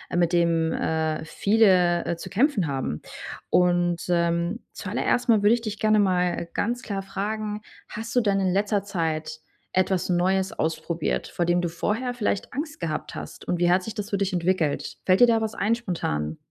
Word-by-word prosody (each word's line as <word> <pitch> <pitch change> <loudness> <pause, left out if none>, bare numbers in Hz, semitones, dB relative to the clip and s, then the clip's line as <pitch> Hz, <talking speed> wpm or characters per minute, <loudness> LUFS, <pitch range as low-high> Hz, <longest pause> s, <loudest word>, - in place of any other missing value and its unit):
mit 175 0 +2
dem, 165 -2 +2
äh, 160 -1 -1
viele, 185 -3 +3
äh, 170 - -1
zu - - -8
kämpfen 220 - +2
haben. 135 - -3 0.5
Und, 175 -1 +3
ähm, 170 +4 0
zu - - -8
aller - - -1
erst 245 - +1
mal 215 -3 +4
würde 210 +3 +6
ich 235 - -5
dich 215 -2 -4
gerne 215 -1 +3
mal 180 -3 +1
ganz 240 +3 -1
klar 195 -3 -3
fragen, 210 +2 -4 0.3
hast 225 +3 -6
du 245 - +5
denn 200 -2 +1
in 185 -1 +1
letzter 205 0 +1
Zeit 160 -5 -3 0.3
etwas 185 -1 +1
Neues 190 +3 +1
ausprobiert, 165 +1 -1
vor 175 - -2
dem 175 +1 +2
du 175 - 0
vorher 220 +9 -2
vielleicht 210 -4 -2
Angst 295 +2 -4
gehabt 160 -3 -3
hast - - -8
und 175 - -1
wie 175 0 +3
hat 180 +1 +3
sich 220 - -6
das 210 -2 -5
für 200 - +1
dich 195 0 0
entwickelt? 175 -4 0
Fällt 185 0 +4
dir 245 - +8
da 225 -1 +3
was 220 0 -2
ein 220 +3 +1
spontan? 80 - -3
185 Hz, 195 wpm, -25 LUFS, 170-215 Hz, 0.5 s, dir